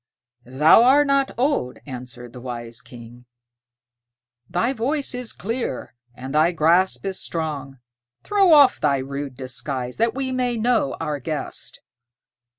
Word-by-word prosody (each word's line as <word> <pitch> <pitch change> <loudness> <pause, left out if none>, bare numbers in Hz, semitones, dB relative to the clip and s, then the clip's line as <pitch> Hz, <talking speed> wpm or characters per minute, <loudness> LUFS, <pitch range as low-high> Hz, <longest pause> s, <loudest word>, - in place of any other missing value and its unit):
"Thou 150 - +6
art 280 +4 +5
not 275 -1 +2
old," 250 - 0
answered 125 -3 -8
the 125 - -10
wise 120 -2 -6
King; 120 0 -13 1.2
"thy 230 +9 0
voice 275 +4 -1
is 250 -2 -3
clear, 225 - -4 0.2
and 130 +2 -7
thy 155 +3 +4
grasp 170 +5 +2
is 190 -1 -3
strong. 145 -5 -4 0.5
Throw 395 -3 +3
off 285 -4 +7
thy 140 -2 +2
rude 140 0 -5
disguise, 130 -1 -4
that 230 +1 +1
we 265 -1 -2
may 250 -2 -1
know 225 - +1
our 150 -1 -3
guest." 150 +3 -5
155 Hz, 135 wpm, -22 LUFS, -, 1.2 s, off